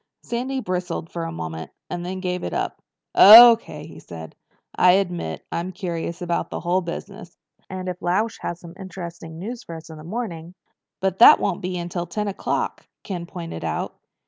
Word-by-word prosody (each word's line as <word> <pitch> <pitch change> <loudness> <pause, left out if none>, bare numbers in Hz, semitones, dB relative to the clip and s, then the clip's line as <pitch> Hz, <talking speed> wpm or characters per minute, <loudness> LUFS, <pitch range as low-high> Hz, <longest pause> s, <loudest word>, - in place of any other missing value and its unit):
Sandy 260 +3 -3
bristled 180 -4 -3
for 170 -1 -4
a 165 - -4
moment 80 - -6 0.2
and 175 0 -5
then 185 +1 -5
gave 180 -1 -2
it - - -3
up. - - -3 0.3
"O.K.," 225 -8 +9
he 160 - -12
said. 80 -2 -10 0.4
"I 180 0 +6
admit 175 - -1
I'm 175 +2 -3
curious 175 -1 -4
about 175 -1 -1
the - - -5
whole 180 +2 +1
business. 180 +2 -8 0.3
And 185 -1 -5
if 180 -1 -5
Lausch 215 +6 0
has 170 - -4
some 170 -1 -11
interesting 170 -4 -8
news 230 +7 -6
for 170 -8 -9
us 160 0 -10
in 155 - -10
the - - -11
morning—" 175 -3 -5 0.5
"But 190 -1 -1
that 235 - +9
won't 190 - -1
be 180 0 -3
until 175 0 -4
ten 210 +5 -3
o'clock," 200 - -3 0.2
Ken 175 -4 -5
pointed 170 - -7
out. 80 -1 -3
180 Hz, 180 wpm, -23 LUFS, 170-190 Hz, 0.5 s, O.K